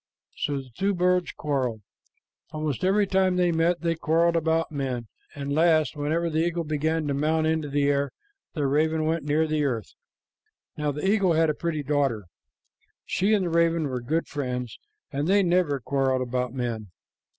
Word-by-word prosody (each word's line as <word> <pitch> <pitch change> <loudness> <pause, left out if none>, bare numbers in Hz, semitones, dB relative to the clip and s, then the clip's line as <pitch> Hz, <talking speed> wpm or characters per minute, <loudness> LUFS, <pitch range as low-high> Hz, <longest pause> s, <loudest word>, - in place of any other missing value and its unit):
So 145 -1 -2
the 135 -2 -8
two 195 +1 0
birds 180 0 +2
quarreled. 130 -7 -2 0.7
Almost 155 -3 -3
every 200 +2 +3
time 190 -1 +2
they 180 -1 +2
met, 170 +1 +1
they 170 -1 +1
quarreled 165 +1 +2
about 165 0 +1
men, 130 -5 -3 0.3
and 140 -1 -4
at - - 0
last, 160 -1 +3
whenever 155 +4 0
the 160 -1 -1
eagle 170 +1 0
began 155 +1 -1
to 145 - -1
mount 155 +3 +1
into 160 -2 0
the 145 +1 +1
air, 140 0 +2 0.5
the 150 -3 0
raven 155 +3 +1
went 160 -1 -1
near 150 +2 +2
the 155 -1 0
earth. 120 -7 -2 0.8
Now 150 -1 -1
the 150 +6 -3
eagle 195 -4 +3
had 160 -1 +3
a - - -3
pretty 155 -2 -3
daughter. 135 -6 0 0.8
She 205 +3 +2
and 195 -3 0
the 170 - -2
raven 165 -1 +2
were 125 -1 -3
good 160 +7 -1
friends, 125 -4 -4 0.3
and 145 +2 -1
they 200 +1 +4
never 175 -5 +2
quarreled 130 0 0
about 125 0 -2
men. 120 -4 -3
155 Hz, 180 wpm, -26 LUFS, 140-170 Hz, 0.8 s, they